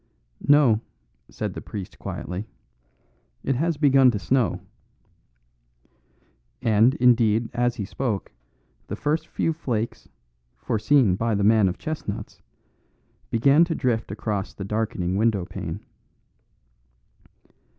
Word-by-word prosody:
"No," 140 -7 +5 0.5
said - - -4
the - - -7
priest 100 -3 -8
quietly, 90 +5 -5 1.0
"it 135 - +1
has 165 +4 0
begun 135 -3 +5
to 115 - 0
snow." 115 +5 +1 2.0
And, 115 +4 +4
indeed, 115 -3 +3
as 120 0 +1
he 105 - -4
spoke, 105 -1 -3 0.6
the - - -4
first 155 +3 -1
few 165 - -1
flakes, 120 -8 -4 0.5
foreseen 110 -2 +2
by 115 +2 0
the 100 - 0
man 105 -2 +5
of 90 - -5
chestnuts, 110 -9 -6 0.9
began 140 +7 +4
to 165 -1 -2
drift 115 -3 -1
across 105 -2 -3
the 95 - -6
darkening 100 -4 -1
windowpane. 105 -4 -1
115 Hz, 110 wpm, -24 LUFS, 105-135 Hz, 2.0 s, No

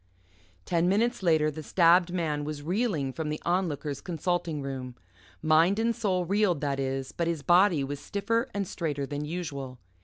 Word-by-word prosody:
Ten 170 +1 +1
minutes 230 +5 +1
later, 160 -4 +3
the 155 +2 -7
stabbed 175 +2 +4
man 155 -5 -1
was 145 -1 -5
reeling 170 - -1
from 160 +1 -3
the 150 - -3
Onlooker's 160 -6 -1
consulting 170 -3 -2
room. 130 -2 -5 0.5
Mind 160 +5 +4
and 230 +1 +1
soul 190 -6 0
reeled, 195 -3 +2
that 140 -2 -1
is, 135 0 -2
but 170 - -2
his 165 -4 -2
body 175 -1 +4
was 140 +1 -4
stiffer 230 - -1
and 200 -1 -2
straighter 145 -5 -3
than 145 +1 -4
usual. 145 -6 -5
165 Hz, 165 wpm, -28 LUFS, 145-185 Hz, 0.5 s, stabbed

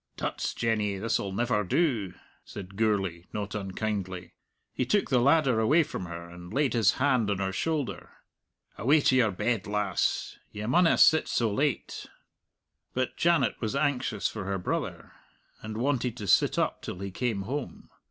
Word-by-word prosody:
"Tuts, - - -3
Jenny, 105 -3 0
this'll 100 -1 -1
never 110 +1 0
do," 110 - 0 0.3
said 100 -1 -9
Gourlay, 95 -5 0
not 105 -1 -4
unkindly. 95 -2 -4 0.4
He - - -1
took 195 - +1
the 125 - +4
ladder 135 -3 +4
away 150 +9 +4
from 150 - -6
her 85 0 -7
and 85 +1 -11
laid 140 +3 +1
his 115 -5 +4
hand 130 -5 +2
on 100 - 0
her 95 0 -1
shoulder. 145 - -2 0.7
"Away 145 +7 +4
to 130 - +3
your 120 -4 +4
bed, 105 +2 -1
lass. 105 -3 -1
You 105 +1 -5
maunna 165 +7 +4
sit 160 -1 +5
so 115 -3 0
late." 145 +5 -1 0.9
But 130 0 -1
Janet 165 -8 +2
was 110 +3 -2
anxious 145 -2 0
for 105 -3 -6
her 100 0 -1
brother, 90 - -4 0.5
and 110 0 -6
wanted 125 -1 0
to 105 - -5
sit 95 - +3
up - - 0
till - - -6
he 100 +1 -5
came 110 -1 -2
home. 135 +6 -6
110 Hz, 160 wpm, -28 LUFS, 100-130 Hz, 0.9 s, sit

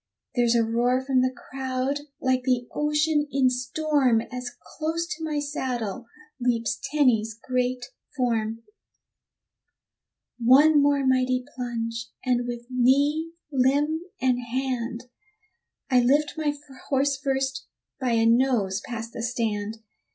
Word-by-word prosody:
There's 240 -2 +3
a 230 - +4
roar 240 +3 +1
from 260 -2 +3
the 255 0 +2
crowd 260 +2 -3 0.2
like 260 -1 +1
the 250 -1 0
ocean 300 0 +1
in 265 -2 +3
storm 255 -2 +1
As 250 0 -4
close 320 +2 -3
to 320 +1 -4
my 305 -2 -1
saddle 245 -7 -3 0.3
leaps 240 -1 0
Tenny's 230 -7 +2
great 250 +1 -1 0.3
form: 230 -3 -1 1.8
One 285 +6 +6
more 280 -1 +2
mighty 255 -1 +2
plunge, 230 -2 -4 0.2
and 245 -1 +1
with 240 -1 -5
knee, 285 +6 +2 0.2
limb, 285 +4 +2 0.2
and 250 -1 +2
hand, 245 -1 -3 0.9
I 250 - +6
lift 285 +5 +2
my 310 -2 0 0.4
horse 275 0 +2
first 270 -1 -2 0.3
by 255 -3 0
a 225 0 +3
nose 230 -5 +2
past 230 -2 -6
the - - -5
stand. 225 -2 -2
255 Hz, 120 wpm, -25 LUFS, 235-275 Hz, 1.8 s, One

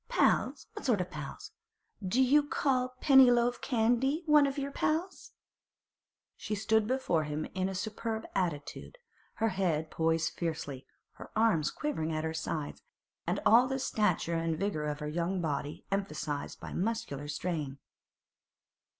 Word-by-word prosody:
'Pals! - - +2
what 425 - -8
sort 235 -7 +2
o' - - +2
pals? 150 -6 -8 0.5
Do 230 +8 +3
you 285 +4 +5
call 255 -3 0
Pennyloaf 245 -3 +6
Candy 255 +6 +1
one 300 -2 +6
o' - - 0
your 280 0 -4
pals?' 330 +6 -2 1.0
She 215 - -4
stood 220 +1 +2
before 220 -11 +1
him 150 +1 -3
in 185 0 -1
a 190 - -5
superb 220 +2 -3
attitude, 170 - -3 0.4
her 225 0 +1
head 170 -5 -1
poised 160 0 +1
fiercely, 150 -5 -4 0.3
her - - -10
arms 215 -9 +3
quivering 165 - -2
at 155 0 -2
her 160 0 -2
sides, 160 -2 -4 0.6
all 240 +3 +7
the 265 0 -1
stature 210 -9 0
and 165 -1 0
vigour 180 -5 -1
of 150 0 -3
her 150 - -3
young 170 +4 -1
body 145 -3 -3
emphasised 155 -7 -3
by - - -8
muscular 185 -9 -2
strain. 150 -2 -3
190 Hz, 140 wpm, -31 LUFS, 155-245 Hz, 1.0 s, all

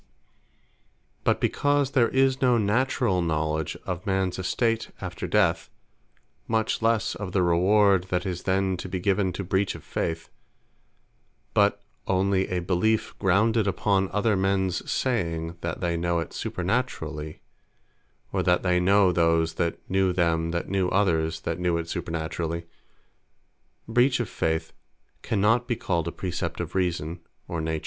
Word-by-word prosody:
But - - +2
because 145 -1 +1
there 125 -5 +3
is 135 0 +2
no 125 -2 +4
naturall 110 -2 +1
knowledge 80 -1 -1
of 90 -1 -4
mans 95 -1 0
estate 115 +4 0
after 90 -2 -5
death; 90 -5 +2 0.8
much 110 0 0
lesse 115 -1 +1
of 95 -3 -6
the 95 - +3
reward 95 +2 +4
that 90 -1 -2
is 90 -2 -3
then 95 0 0
to 90 - -6
be 95 - -3
given 95 0 +1
to 100 - -4
breach 95 +2 0
of - - -11
Faith; 80 0 -3 1.2
but 100 0 +2 0.2
onely 95 0 +2
a 90 -1 -2
beliefe 95 +5 +1
grounded 105 +3 +2
upon 95 0 +1
other 105 +1 +1
mens 95 -1 0
saying, 85 -9 -1
that 85 -1 -4
they 85 -2 0
know 85 0 0
it 85 -3 -4
supernaturally, 80 -7 -3 0.9
or - - +1
that 90 0 +2
they 90 -1 +2
know 95 +1 +4
those, 85 -1 +2
that 85 0 -1
knew 95 0 +2
them, 85 -2 +1
that 85 0 -2
knew 95 -2 0
others, 80 -5 +1
that 80 +1 -3
knew 90 -1 +1
it 85 0 -4
supernaturally; 85 0 -3 1.2
Breach 125 +3 +3
of 120 - -2
Faith 80 0 -2 0.5
cannot 110 +4 +2
be 120 - 0
called 85 -6 -1
a - - -2
Precept 90 0 -4
of - - -4
Reason, 85 -2 -1 0.3
or 85 -2 -3
Nature. 80 0 -2
95 Hz, 145 wpm, -26 LUFS, 85-105 Hz, 1.2 s, no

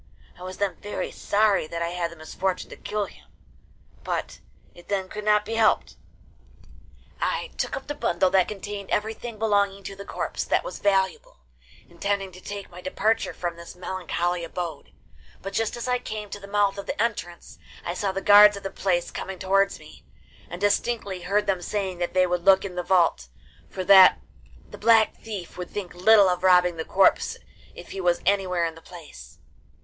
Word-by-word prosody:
I - - -18
was 185 0 -7
then 200 -2 -1
very 205 - -5
sorry 205 -5 +1
that 170 +1 -3
I 170 - -1
had 175 -1 -2
the 170 - -12
misfortune 180 +3 -3
to - - -7
kill 210 -1 -3
him, - - -17 0.8
but - - -4 0.3
it 175 - -16
then 195 -2 -1
could 210 - -6
not 210 0 +3
be 225 - -5
helped. 225 -1 +2 1.2
I - - -2
took - - -2
up 270 - -8
the 290 - -4
bundle 185 -9 +1
that 190 -2 +4
contained 205 -1 -6
everything 220 +2 -3
belonging 200 -2 +1
to 195 - -7
the 200 - -9
corpse - - -4
that - - +1
was - - -7
valuable, 190 - 0 0.5
intending 195 +2 -2
to 185 +1 -13
take 200 -1 -7
my 180 +1 -10
departure 215 +5 0
from 175 -1 -4
this 170 +1 -11
melancholy 180 -1 -2
abode; 165 -3 -6 0.5
but 195 - -7
just 225 +2 -1
as 240 - -5
I 250 0 +1
came 215 -4 -6
to 205 - -6
the 200 - -11
mouth 200 -1 +1
of 200 - -8
the - - -4
entrance 205 -7 -3 0.3
I 175 - -2
saw 195 +2 -1
the 195 +1 -4
guards 205 0 +8
of 200 - -10
the 195 - -4
place 175 -3 -1
coming 190 -1 -6
towards 195 +2 +2
me, - - -15 0.5
and 175 - -7
distinctly 205 -1 0
heard 200 +4 0
them 190 -3 0
saying 190 -1 -3
that 175 +1 -3
they 185 0 +5
would 175 -1 -1
look 195 +1 +5
in 190 - -6
the 180 - -2
vault, 170 - +2 0.4
for 185 - -5
that 190 0 +8 0.5
the - - -12
Black 225 -1 +4
Thief 200 -5 -7
would 180 - -5
think 200 -4 -6
little 200 +3 +6
of 180 -1 0
robbing 180 -2 +4
the 160 - -4
corpse 195 0 +3 0.4
if - - -11
he 195 - -5
was 175 -1 +2
anywhere 185 -3 +1
in 165 - -3
the 165 - -15
place. 150 - -13
195 Hz, 195 wpm, -25 LUFS, 180-205 Hz, 1.2 s, guards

